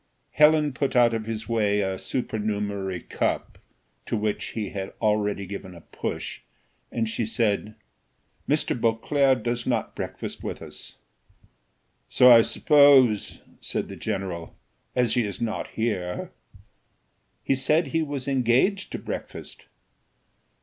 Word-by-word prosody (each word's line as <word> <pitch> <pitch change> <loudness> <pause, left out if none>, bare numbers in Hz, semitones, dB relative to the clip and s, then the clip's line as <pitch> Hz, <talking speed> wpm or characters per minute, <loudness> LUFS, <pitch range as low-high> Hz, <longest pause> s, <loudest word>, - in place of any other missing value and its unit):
Helen 150 -1 +4
put 135 +1 -2
out 120 -1 +5
of 110 -1 -3
his 110 -1 -4
way 105 -3 +1
a 95 -1 -2
supernumerary 100 -5 -3
cup, - - -2 0.5
to - - -1
which 105 0 -1
he 105 -3 -2
had 95 -1 -5
already 105 -2 0
given 95 -1 -8
a 85 - -12
push, - - -5 0.5
and 115 -1 -1
she 110 +1 -2
said, 110 -1 -1 0.7
"Mr. 150 +2 +1
Beauclerc 125 +2 +2
does 120 0 -2
not 120 -3 -1
breakfast - - -6
with - - -4
us." - - -10 1.1
"So 125 0 +7
I 115 -1 +9
suppose," 135 -5 +4 0.2
said - - -4
the - - -7
general, 95 -5 -4 0.4
"as 125 -3 +2
he 120 - +2
is 100 -3 -5
not 115 -2 -2
here." 95 -6 -3 1.1
"He - - +2
said 140 +4 +2
he 165 +4 +1
was 140 -4 -4
engaged 135 - +2
to - - -2
breakfast." - - -7
115 Hz, 130 wpm, -25 LUFS, 105-130 Hz, 1.1 s, I